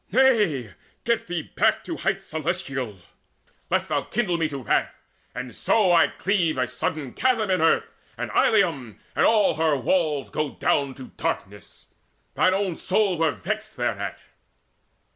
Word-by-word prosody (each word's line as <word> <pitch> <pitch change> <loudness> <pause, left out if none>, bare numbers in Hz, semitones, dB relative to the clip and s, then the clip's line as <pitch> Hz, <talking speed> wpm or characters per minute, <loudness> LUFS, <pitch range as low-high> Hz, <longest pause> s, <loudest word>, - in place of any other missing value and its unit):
Nay, 210 - +3 0.3
get 235 -1 0
thee 175 -3 -2
back 220 0 +2
to 335 - -5
heights 195 0 -1
Celestial, 150 - -3 0.7
lest - - +1
thou - - +1
kindle 205 -6 -1
me 165 -2 0
to 140 -3 -6
wrath, 100 - +1 0.4
And 125 -1 -6
so 205 -5 +2
I 165 -4 +6
cleave 175 -5 0
a 125 -1 +1
sudden 125 +2 -3
chasm 230 -6 +1
in 185 - +2
earth, 165 - +2 0.2
And - - -4
Ilium 140 - +2 0.2
and - - +3
all 215 -7 +3
her 160 -2 +2
walls 150 0 0
go 150 -2 -2
down 140 -3 +1
To 130 - -10
darkness. - - -5 0.5
Thine 185 0 +3
own 195 -4 -1
soul 190 -3 +1
were 165 -1 +3
vexed 215 +6 -4
thereat." 110 -5 -2
165 Hz, 150 wpm, -24 LUFS, 135-200 Hz, 0.7 s, I